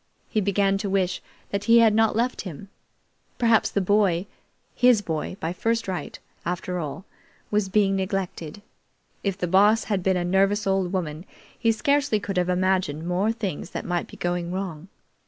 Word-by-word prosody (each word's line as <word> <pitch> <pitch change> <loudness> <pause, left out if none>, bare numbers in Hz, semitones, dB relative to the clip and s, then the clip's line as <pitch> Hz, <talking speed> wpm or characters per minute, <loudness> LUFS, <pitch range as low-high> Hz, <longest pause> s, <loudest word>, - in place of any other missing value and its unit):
He 215 - +1
began 195 0 +1
to 200 -1 -3
wish 190 -2 0 0.3
that 200 0 -2
he 235 0 +6
had 225 -2 +6
not 220 0 +3
left 240 +3 0
him. 190 +1 -9 0.7
Perhaps 230 -2 +3
the 200 - 0
boy 190 -2 +2 0.5
his 245 -3 +5
boy 160 +2 -3
by 165 +2 -2
first 230 +3 -1
right, 185 -2 -4 0.3
after 180 +1 -3
all 155 +4 -5 0.5
was 205 -2 +1
being 195 -1 +2
neglected. 190 -2 -4 0.6
If 195 -2 -1
the 180 - -1
Boss 205 +5 +4
had 200 -3 -1
been 190 0 +2
a 175 - -1
nervous 195 +3 +2
old 190 -2 +1
woman, 165 -4 -3 0.3
he 230 -2 +2
scarcely 275 +1 +1
could 195 -2 -4
have 180 0 +1
imagined 180 -4 0
more 185 +5 +1
things 200 -8 -4
that - - -5
might 175 -1 -1
be - - -13
going 175 -1 -2
wrong. 180 -3 -5
195 Hz, 175 wpm, -25 LUFS, 180-210 Hz, 0.7 s, he